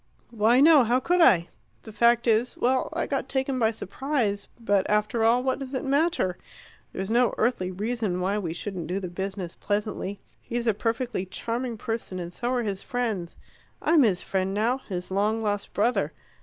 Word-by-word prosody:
"Why, 230 +3 +4
no; 300 -3 +7
how 240 +2 +2
could 355 +6 +2
I? 180 - +5 0.4
The 220 - -10
fact 235 +2 +3
is 230 +1 +2
well, 255 +1 +1
I 330 - -1
got 275 -1 -3
taken 265 -1 -1
by 220 -2 +3
surprise, 225 -1 -2
but 205 -4 +1
after 210 +2 +1
all, 235 +3 +4
what 260 +1 0
does 270 0 -6
it 260 - -2
matter? 280 - +1 0.5
There's 190 +3 -4
no 245 +1 +3
earthly 220 -6 +1
reason 210 -1 -2
why 195 +3 0
we 175 -5 -3
shouldn't 175 -1 -5
do 185 +2 -2
the 185 -2 -5
business 190 -1 -5
pleasantly. 205 -1 -3 0.2
He's 240 0 -3
a 225 - +3
perfectly 230 -2 -2
charming 235 +4 -3
person, 225 -3 -4
and 175 -1 -6
so 240 - -3
are 250 -1 0
his 200 -3 -2
friends. 220 -9 -3 0.4
I'm 320 -1 +4
his 200 -8 +2
friend 190 0 -1
now 235 +5 +1
his 185 -7 -5
long 210 +3 +1
lost 205 -1 -2
brother. 200 -8 +1
225 Hz, 185 wpm, -26 LUFS, 195-245 Hz, 0.5 s, no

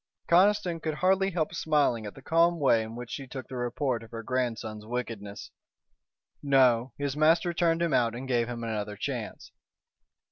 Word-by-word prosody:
Conniston 185 -1 +3
could 155 -1 -2
hardly 190 +3 +2
help 165 -4 -2
smiling 145 -9 +1
at 105 - -9
the 135 - -13
calm 170 +3 +3
way 130 -6 +4
in 110 +1 -7
which 120 0 -8
she 135 -2 -6
took 130 0 -7
the 130 - -8
report 120 0 -1
of 115 - -12
her 115 0 -7
grandson's 115 -3 -3
wickedness. 110 -3 -6 0.9
"No, 130 -3 +3
his 145 -1 -2
master 165 +3 +3
turned 170 -1 +1
him 165 -4 0
out 115 -1 +2
and 130 +2 -6
gave 120 -3 +1
him 120 -1 -5
another 105 -2 -3
chance." - - -5
130 Hz, 175 wpm, -28 LUFS, 115-165 Hz, 0.9 s, way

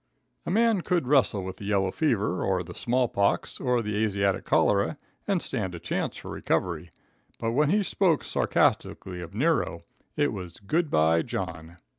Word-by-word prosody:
A - - 0
man 220 +1 +3
could 175 -4 0
wrestle 125 -7 +3
with 95 0 -6
the 100 - -8
yellow 100 -2 +1
fever, 105 - 0
or 95 -2 0
the - - -9
small 125 +1 +1
pox, 100 -2 0
or 125 -3 +1
the 105 0 -1
Asiatic 100 -3 0
cholera 100 +9 +2 0.3
and 195 -4 +1
stand 95 -9 -3
a - - -7
chance 85 - -3
for - - -8
recovery, - - -1 0.5
but 115 - -1
when 145 +5 +2
he 205 +4 +3
spoke 180 -5 +2
sarcastically 90 -2 0
of 85 +3 -9
Nero, 130 - +1 0.3
it 145 -3 +2
was 90 -4 -7
good 155 - 0
bye 80 - +3
John. 80 +1 -5
105 Hz, 170 wpm, -27 LUFS, 95-150 Hz, 0.5 s, man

